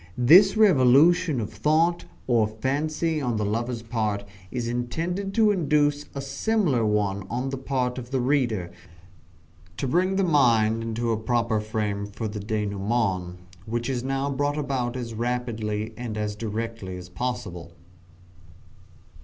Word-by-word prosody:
This 185 - +7
revolution 160 - +5
of 105 - -4
thought, 165 +3 +2 0.2
or 115 -4 +3
fancy, 150 +8 -1
on 120 -4 -1
the 105 - -1
lover's 115 +3 -2
part, 110 -3 -2 0.3
is 120 +1 -3
intended 165 +11 -2
to 220 -2 +5
induce 145 -5 +1
a 140 - -3
similar 140 - 0
one 100 -2 0
on 125 +3 -2
the 135 - -3
part 130 -2 -1
of 120 -1 -9
the 135 0 0
reader 120 -9 0 1.1
to 135 - -2
bring 185 +7 +1
the 195 - +2
mind 115 -9 +3
into 115 +1 -2
a 110 - +1
proper 115 -1 0
frame 105 -1 -2
for 105 +2 -5
the 105 0 -5
denouement 100 -3 -2 0.3
which 120 +3 -2
is 125 -2 -2
now 135 +1 -1
brought 145 +2 -1
about 130 -4 -2
as 115 -2 -5
rapidly 115 -2 -2
and 115 -3 -5
as 105 -1 -2
directly 110 -3 -5
as 90 0 -9
possible. 90 -5 -5
120 Hz, 145 wpm, -25 LUFS, 110-140 Hz, 1.1 s, This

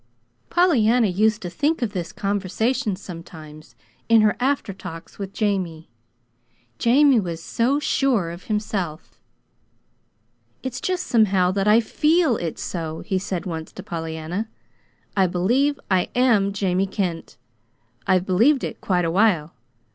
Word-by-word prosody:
Pollyanna 250 -10 +3
used 215 +3 +1
to 175 - -4
think 290 - 0
of 215 -3 -2
this 180 -2 -4
conversation 205 +2 -1
sometimes, 160 -4 -11 0.3
in 225 -1 +6
her 210 -1 +3
after 260 -5 0
talks 180 -2 -10
with 195 -1 -5
Jamie. 185 - -2 0.9
Jamie 270 +1 +5
was 170 -5 -4
so 240 +10 0
sure 250 - +1
of 175 +2 -10
himself. 205 -7 -3 1.4
"It's 260 -1 -4
just 365 -1 -1
somehow 195 -6 +3
that 195 +1 -1
I 215 +2 +6
FEEL 305 +2 +2
it's 165 -2 -4
so," 160 -2 -4
he 190 -3 -1
said 185 -1 -4
once 160 -3 -5
to 190 - -9
Pollyanna. 165 +3 -4 0.7
"I 190 -2 +3
believe 245 +12 +1
I 185 -1 +2
am 230 -6 +3
Jamie 195 -1 0
Kent. 180 - -4 0.7
I've 185 -1 +3
believed 235 +10 +3
it - - -5
quite 180 -3 +1
a 165 - 0
while. 180 -5 +2
195 Hz, 135 wpm, -23 LUFS, 175-230 Hz, 1.4 s, in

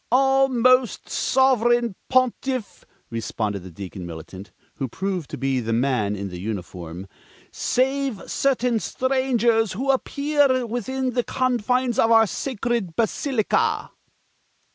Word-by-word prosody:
"All, 270 +1 +4
Most 255 -1 +3
Sovereign 240 -3 +2 0.2
Pontiff," 255 -2 0 0.3
responded 110 -3 -3
the 95 - -10
Deacon 95 +1 -8
Militant, 85 +4 -9 0.3
who 135 - -2
proved 185 - -3
to - - -6
be 135 0 0
the 115 -1 -2
man 115 -4 +1
in 100 0 -5
the 90 -1 -7
uniform, 90 -3 -6 0.4
"save 265 -4 0
certain 250 -4 +1
strangers 240 -4 +1
who 265 +7 +1
appear 280 -1 +1
within 255 +3 -2
the 245 0 0
confines 250 -1 0
of 225 - +4
our 225 -1 +6
sacred 230 - -2
basilica." 230 0 0
235 Hz, 120 wpm, -23 LUFS, -, 0.4 s, our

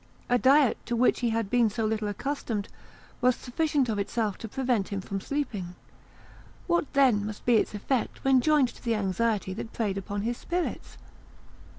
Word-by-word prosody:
A 245 0 +3
diet 270 -1 +4
to 240 - 0
which 245 +2 +3
he 240 - +1
had 225 -3 -1
been 240 -2 +4
so 220 +2 -2
little 215 -1 -1
accustomed 220 -2 -3 0.5
was 250 0 +4
sufficient 285 +1 0
of 215 -3 -1
itself 210 0 -1
to 225 - -6
prevent 245 -4 0
him 200 - -3
from 195 0 -4
sleeping; 205 -12 -3 0.9
what 345 -4 0
then 260 -7 +4
must 210 0 -6
be 240 -2 +5
its 210 - 0
effect 240 +4 -2
when 265 -1 +4
joined 295 -3 +3
to - - -15
the 230 -2 +1
anxiety 205 0 0
that 225 - -7
preyed 200 -4 -1
upon 200 +1 -4
his 240 +2 -2
spirits? 355 0 -3
230 Hz, 180 wpm, -27 LUFS, 205-260 Hz, 0.9 s, be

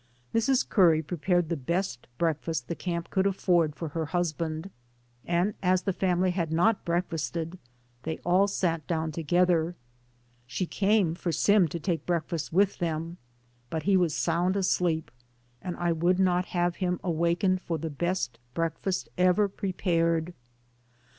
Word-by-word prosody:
Mrs. 255 +3 +2
Curry 165 -6 +4
prepared 175 +2 0
the 170 - 0
best 160 -2 -2
breakfast 165 -1 -1
the - - -2
camp 170 0 -4
could 190 0 +2
afford 175 -5 +2
for 165 0 -5
her 160 +1 -3
husband, 165 +1 -2 0.6
and 175 +4 +1
as 185 -1 +2
the 195 - 0
family 185 0 +1
had 170 -3 -2
not 190 +6 +2
breakfasted, 170 0 -2 0.4
they 160 +3 -3
all 185 +3 +4
sat 165 -6 -1
down 160 -2 -1
together. 170 +2 +1 0.7
She 155 +9 -2
came 195 -2 +2
for 175 0 -3
Sim 200 +1 +4
to 170 +2 -5
take 165 -2 -2
breakfast 165 -2 -2
with 195 +3 +2
them, 165 0 -2 0.5
but 160 +4 -3
he 200 0 +3
was 175 -5 +2
sound 175 +3 +1
asleep, 180 -4 0 0.5
and 180 -2 -5
I 175 -1 0
would 175 +3 +2
not 180 -1 +2
have 175 -1 -1
had - - -21
him 180 0 -1
awak 170 0 0
ened 185 -2 +2
for 170 -3 -3
the 160 +1 -4
best 170 -6 -2 0.2
breakfast 165 +3 -1
ever 185 +3 +4
prepared. 175 -4 0
175 Hz, 155 wpm, -28 LUFS, 165-185 Hz, 0.7 s, Curry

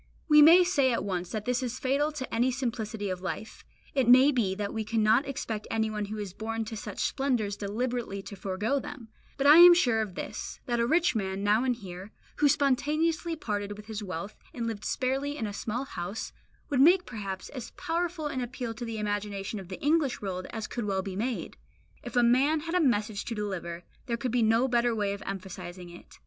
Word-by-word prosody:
We 300 -1 +7
may 335 +4 +9
say 285 -8 +2
at 230 - 0
once 180 -3 -3
that 215 -1 -4
this 250 0 0
is 250 -1 -3
fatal 275 +4 +1
to 260 -5 -6
any 240 +3 +2
simplicity 225 -5 -3
of 180 -1 -4
life; 215 +3 -6 0.3
it 265 -4 +1
may 260 +3 +8
be 215 -8 0
that 205 0 -3
we 220 -1 -2
cannot 220 +4 +2
expect 225 -6 -4
anyone 220 -2 -1
who 215 +2 -6
is 205 -4 -5
born 225 +2 -3
to 220 - -6
such 210 -1 -7
splendours 245 -7 0
deliberately 210 0 -3
to 200 - -8
forego 200 +8 -1
them; 250 -4 -9 0.3
but 275 - -1
I 295 +3 +9
am 350 0 +10
sure 245 -10 +3
of 200 -5 -5
this, - - -6
that 240 -1 -1
a 235 - +2
rich 345 +5 +3
man, 195 -2 -2
now 210 +3 +3
and 255 -2 +1
here, 185 -2 -9 0.3
who 295 - +4
spontaneously 305 +4 +1
parted 205 -7 -4
with 210 - -11
his 215 -1 -5
wealth, 195 +1 -5 0.2
and 235 -2 -3
lived 220 -2 -4
sparely 275 +3 -1
in 225 - -2
a 205 - -4
small 225 +5 -3
house, 195 -2 -5 0.4
would 270 -2 +3
make 360 +5 +6
perhaps 195 -5 -6
as 250 -4 -7
powerful 340 -1 -2
an 270 -3 -2
appeal 245 -1 -4
to 240 +2 -6
the 225 -1 -4
imagination 205 -1 -3
of 190 - -9
the 185 - -7
English 295 -3 +2
world 185 -2 -4
as 220 -2 -5
could 240 -3 -4
well 190 -2 -1
be 190 -1 -5
made. 235 +4 -3 0.4
If - - -8
a 245 - +5
man 270 +6 +3
had 330 +2 -5
a 360 - +3
message 215 -7 +1
to 230 - -4
deliver, 175 -5 -4 0.2
there 235 -1 -1
could 240 +1 -2
be 245 0 +2
no 225 +3 +3
better 240 -2 +2
way 205 -2 0
of 200 - -7
emphasizing 185 -2 -7
it. 175 - -14
225 Hz, 215 wpm, -28 LUFS, 205-265 Hz, 0.4 s, am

